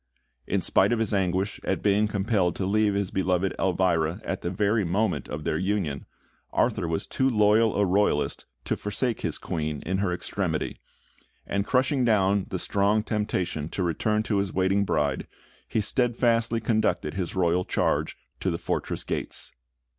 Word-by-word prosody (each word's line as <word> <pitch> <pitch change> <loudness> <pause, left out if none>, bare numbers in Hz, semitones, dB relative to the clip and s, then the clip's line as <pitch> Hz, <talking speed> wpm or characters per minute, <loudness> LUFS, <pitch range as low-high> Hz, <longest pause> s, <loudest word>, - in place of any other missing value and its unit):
In - - 0
spite - - +3
of 120 - +2
his 110 -2 0
anguish 95 +1 0
at 95 - -1
being 105 +1 +3
compelled 100 -3 0
to 95 - -2
leave 105 +1 +2
his 100 -2 -1
beloved 95 0 +1
Elvira 90 -2 +1
at 95 - -3
the 85 - -2
very 105 +4 +1
moment 90 -3 0
of 75 +1 -5
their 75 - -1
union, 95 -7 -1 0.4
Arthur - - +1
was 80 0 -1
too 135 0 +1
loyal 110 -1 +4
a 100 - +3
Royalist 95 -5 +1 0.2
to - - 0
forsake 115 +3 -2
his - - -1
Queen 75 -3 -3
in 95 +3 -1
her 100 -2 0
extremity; 90 - -2 0.7
and 100 0 -1
crushing 130 +1 +2
down 100 -4 +2
the 95 - -2
strong 100 +3 +1
temptation 95 -8 -2
to 95 - -2
return 105 +6 0
to 105 -2 0
his 100 -1 0
waiting 95 +2 +2
bride, 70 -7 0 0.4
he 110 - 0
steadfastly 115 0 +1
conducted 110 -9 0
his 90 -2 -3
royal 90 -1 +2
charge - - 0 0.2
to - - 0
the - - -1
fortress - - -2
gates. - - -3
100 Hz, 165 wpm, -26 LUFS, 90-110 Hz, 0.7 s, loyal